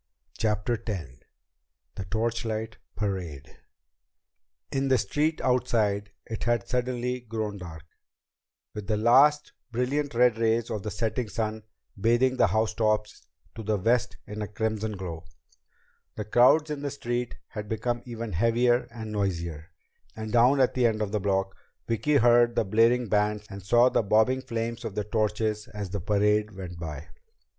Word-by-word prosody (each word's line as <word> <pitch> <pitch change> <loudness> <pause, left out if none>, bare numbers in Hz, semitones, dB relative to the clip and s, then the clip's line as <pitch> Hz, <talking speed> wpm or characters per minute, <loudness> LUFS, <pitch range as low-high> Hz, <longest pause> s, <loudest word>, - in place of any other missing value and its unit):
CHAPTER 110 +1 -1
X 90 - -3 0.8
The 95 - -6
Torchlight 110 +1 -2 0.2
Parade 90 -8 -4 1.1
In 135 0 0
the 130 -1 +4
street 150 +9 0
outside 105 -5 +1 0.2
it 110 0 -5
had 120 -4 +1
suddenly 125 0 -1
grown 110 -3 -4
dark, 80 -3 -9 0.9
with 105 -2 -7
the 105 0 +1
last, 140 +7 +4 0.2
brilliant 130 +3 -1
red 120 -2 +4
rays 115 0 +1
of 105 - -2
the 105 - -4
setting 115 +2 -2
sun 110 0 -2 0.3
bathing 120 +5 +2
the - - +5
housetops 110 -1 0 0.3
to 115 - -7
the 110 -1 0
west 115 +5 +1
in 105 0 -6
a 105 - -3
crimson 110 0 -2
glow. 85 -3 -6 0.9
The 105 - -4
crowds 130 +8 +4
in 145 -1 -4
the 145 - -2
street 120 -3 -3
had 105 -1 -7
become 120 +2 -1
even 115 -2 -5
heavier 120 +5 +2
and 110 -2 -7
noisier, 85 -6 -3 0.5
and 110 -1 -5
down 125 +4 +5
at 130 - +3
the 125 -2 +3
end 110 -1 0
of 100 - -4
the 105 - 0
block, 95 -1 0 0.3
Vicki 130 +6 +1
heard 120 -2 +5
the - - +2
blaring 115 +4 +3
bands 105 +1 +1
and 100 0 -7
saw 120 +6 +5
the - - +2
bobbing 110 +5 +3
flames 115 -2 -4
of 105 - -5
the 105 - -1
torches 105 0 -1
as 100 -3 -5
the 100 -2 -3
parade 105 +2 +1
went 90 -3 -7
by. 80 -1 -6
110 Hz, 155 wpm, -27 LUFS, 105-120 Hz, 1.1 s, the